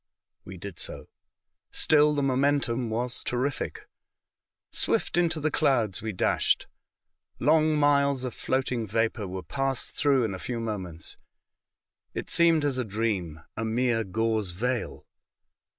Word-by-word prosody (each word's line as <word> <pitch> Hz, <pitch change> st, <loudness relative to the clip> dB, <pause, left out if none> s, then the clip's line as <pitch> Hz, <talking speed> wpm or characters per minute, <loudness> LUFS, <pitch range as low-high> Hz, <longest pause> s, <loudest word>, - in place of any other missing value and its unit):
We 95 Hz, 0 st, -8 dB
did 90 Hz, -1 st, -8 dB
so. -, -, -5 dB, 0.6 s
Still 150 Hz, -1 st, +4 dB
the 145 Hz, -, +1 dB
momentum 130 Hz, -3 st, +1 dB
was 120 Hz, +2 st, -2 dB
terrific. 130 Hz, +3 st, -2 dB, 0.8 s
Swift -, -, +1 dB
into 170 Hz, -2 st, +2 dB
the 155 Hz, +1 st, 0 dB
clouds 110 Hz, -11 st, +1 dB
we 110 Hz, 0 st, -3 dB
dashed. 90 Hz, -, +1 dB, 0.7 s
Long 155 Hz, -1 st, +3 dB
miles 140 Hz, -2 st, +3 dB
of 125 Hz, -3 st, -3 dB
floating 130 Hz, -3 st, -1 dB
vapour 110 Hz, 0 st, 0 dB
were 95 Hz, 0 st, -5 dB
passed 135 Hz, -, -2 dB
through 140 Hz, -3 st, +3 dB
in 110 Hz, -4 st, -1 dB
a 95 Hz, -, -6 dB
few 120 Hz, +3 st, -3 dB
moments. 95 Hz, -8 st, -5 dB, 1.0 s
It -, -, -4 dB
seemed 165 Hz, -3 st, +4 dB
as 135 Hz, -3 st, 0 dB
a -, -, +1 dB
dream, 100 Hz, -8 st, -2 dB
a 115 Hz, -, -3 dB
mere 115 Hz, 0 st, +1 dB
gauze 110 Hz, -1 st, 0 dB
veil. 120 Hz, +6 st, -2 dB
120 Hz, 135 wpm, -27 LUFS, 110-140 Hz, 1.0 s, Still